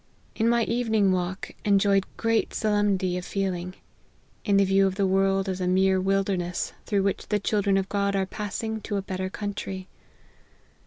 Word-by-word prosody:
In 225 0 +1
my 235 0 +3
evening 220 -4 +1
walk 185 +1 -2
enjoyed 200 -1 +3
great 225 -1 0
solemnity 200 -4 +1
of - - -8
feeling, 185 -2 -3 0.7
in 200 -2 +3
the 200 - +5
view 195 0 +4
of 190 - -2
the 200 0 +1
world 195 +1 +2
as 190 -1 -3
a 180 - 0
mere 190 +1 +3
wilderness, 190 -2 -1
through 200 -2 +1
which 195 -1 -1
the 210 - +1
children 200 -1 +1
of 195 0 0
God 200 0 0
are 195 -1 +1
passing 215 +2 -4
to 205 0 -3
a 195 - -2
better 185 0 -3
country. 195 -2 -5
195 Hz, 170 wpm, -26 LUFS, 190-205 Hz, 0.7 s, the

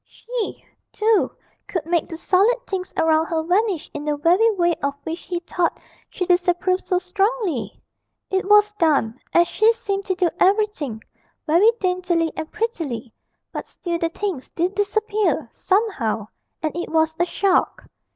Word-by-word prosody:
She, 475 -2 -6 0.3
too, 435 -1 +2 0.4
could 350 -5 -3
make 335 -1 0
the 325 - -6
solid 420 +9 +2
things 375 -1 -4
around 320 0 +3
her 320 -1 -1
vanish 365 -1 +1
in 295 - -5
the 300 -1 -1
very 355 +9 +4
way 345 -2 +2
of 280 0 -1
which 325 +2 -4
he 355 -2 -4
thought 350 0 -1 0.3
she 365 - -3
disapproved 355 +1 +2
so 365 - +1
strongly! 365 - -1 0.5
It 380 +1 0
was 420 0 +6
done, 310 - +1
as 345 0 +4
she 435 +1 +4
seemed 400 -4 -3
to 375 - -1
do 360 -3 +1
everything, 375 - +1 0.4
very 340 +8 +5
daintily 360 -3 0
and 315 - -5
prettily 300 - -3 0.4
but - - -6
still 340 -2 -4
the 330 - 0
things 350 -6 -4
did 355 +3 -1
disappear, 420 +1 0
somehow, 275 - 0 0.3
and 310 -1 -1
it 345 - -3
was 320 0 +2
a 345 - +3
shock. 380 +1 +1
360 Hz, 155 wpm, -22 LUFS, 320-410 Hz, 0.5 s, was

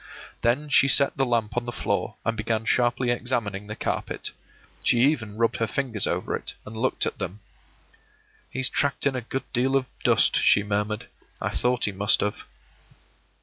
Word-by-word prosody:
Then 130 +6 +1
she 135 -1 +5
set 140 0 +4
the 135 -1 +1
lamp 115 -3 0
on 120 0 -1
the 120 - -4
floor, - - -2
and 115 - 0
began 110 +1 -1
sharply 120 +1 +2
examining 115 -5 -2
the 105 - -5
carpet. - - -3 0.5
She 120 - +4
even 120 -7 +1
rubbed 115 0 +1
her 115 - 0
fingers 115 -2 -1
over - - -1
it, - - -6
and 105 - -9
looked 125 +4 0
at - - -4
them. 100 +5 -5 1.1
“He's 130 0 0
tracked 140 0 0
in 140 -2 +2
a 125 - -2
good 135 +3 -4
deal 130 +2 +2
of 135 -1 +2 0.2
dust,” - - +4
she 100 - +5
murmured. 105 +1 -2 0.3
“I - - -1
thought 125 0 +1
he 105 - -1
must 100 +2 +3
have. 105 0 -2
120 Hz, 180 wpm, -25 LUFS, 105-130 Hz, 1.1 s, she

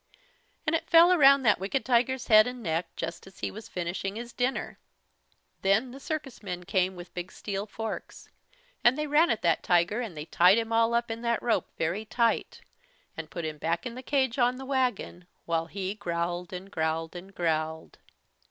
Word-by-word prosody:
And 320 - +2
it 330 0 -3
fell 340 +2 +7
around 275 -4 +6
that 215 -4 +4
wicked 200 +8 -2
tiger's 250 +1 +2
head 215 0 +7
and 250 -1 -6
neck, 165 -1 -1
just 165 +3 -5
as 190 - -16
he - - -2
was 220 +2 -10
finishing 180 +3 -3
his 235 +1 -7
dinner. 250 +2 -2 0.8
Then 210 +6 +2
the 270 - -10
circus 290 -3 -5
men 180 -3 -5
came 185 +1 0
with 175 0 -11
big 180 0 -6
steel 200 0 -4
forks, 225 +1 -6 0.6
and 240 +3 +5
they 300 - -1
ran 305 +3 +4
at 225 - -1
that 170 -1 +2
tiger, 180 +6 +2
and 205 -10 -6
they 150 - -5
tied 180 +5 +5
him 225 0 -1
all 230 +1 +3
up 235 -1 0
in 225 +1 -5
that 235 -1 0
rope 240 - +1
very 170 +7 -1
tight, 230 +1 0 0.5
and 160 -1 -7
put 165 +3 -5
him 155 -1 -5
back 170 - -1
in 245 - -4
the 255 - -7
cage 265 -2 0
on 245 +1 +3
the 265 +1 -8
wagon, 250 -9 -1 0.2
while 165 -1 -1
he 190 +1 -4
growled 175 -3 -3
and 190 +2 -8
growled 160 0 -2
and 190 +2 -10
growled. 160 -1 -2
210 Hz, 195 wpm, -28 LUFS, 175-245 Hz, 0.8 s, fell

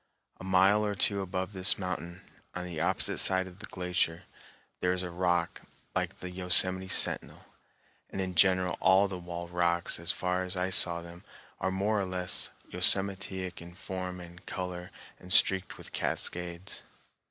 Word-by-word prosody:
A - - -9
mile 95 +3 +4
or 105 -1 -1
two 100 +2 +2
above 95 +1 -4
this 95 +1 +5
mountain, 90 -1 -5 0.3
on 90 0 -4
the 85 -3 -5
opposite - - +3
side 95 0 +3
of 95 +1 -13
the 110 - -7
glacier, 90 -1 -1 0.6
there 90 0 +1
is 90 0 -2
a 90 - -5
rock 90 -1 0 0.3
like - - -3
the 90 - -6
Yosemite 95 +1 +2
Sentinel; - - 0 0.6
and - - -6
in 95 -1 -2
general 90 0 +3
all 95 +2 +5
the 95 -2 -6
wall 85 0 -6
rocks 85 -1 +1
as 85 +1 +4
far 90 +1 -1
as 90 0 -2
I 90 +1 -1
saw 85 -2 +3
them 85 +1 -12 0.4
are - - 0
more 100 +3 0
or - - -1
less 90 -1 -1 0.2
yosemitic 95 -2 +1
in 85 +1 -11
form 90 -1 -6
and 90 +1 -12
color 90 -1 -5 0.3
and 90 - -11
streaked 95 0 +4
with - - -8
cascades. 90 +2 -2
90 Hz, 165 wpm, -30 LUFS, 90-95 Hz, 0.6 s, this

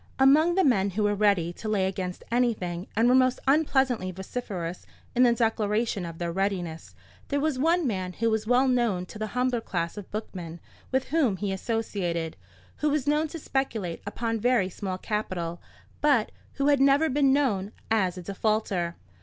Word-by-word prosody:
Among 300 +6 +5
the 380 - +4
men 205 - +3
who 205 +3 -1
were 205 0 +2
ready 200 -5 +2
to 215 - -6
lay 200 -3 +2
against 190 -2 -4
anything, 210 -7 0
and 225 +3 +4
were 250 - +5
most 255 -1 +4
unpleasantly 265 -8 +2
vociferous 185 -2 -5 0.3
in 245 - +2
the 245 -2 +6
declaration 220 -4 0
of 165 -1 -8
their 170 0 -2
readiness, 180 -3 -3 0.3
there 285 - 0
was 290 -3 0
one 335 +3 +2
man 185 -6 -2
who 230 +4 0
was 220 0 -1
well 250 +3 +4
known 235 -8 +1
to 210 - -11
the 215 - -2
humbler 250 -2 +1
class 170 -3 -3
of 205 - -8
bookmen 175 -6 -6 0.3
with 265 0 0
whom 270 -10 +2
he 200 +1 -2
associated, 190 -6 -2 0.4
who 300 - +1
was 290 -2 0
known 300 +2 +2
to 330 - -7
speculate 230 - -2
upon 225 +2 -2
very 235 -4 +2
small 185 0 -4
capital, 185 -5 -3 0.4
but 280 -7 +3 0.2
who 280 +1 +1
had 285 -2 +4
never 280 +3 +5
been 275 -1 +3
known 215 -9 +1 0.2
as 190 -5 +2
a 180 - -7
defaulter. 195 -3 -1
215 Hz, 180 wpm, -27 LUFS, 185-260 Hz, 0.4 s, the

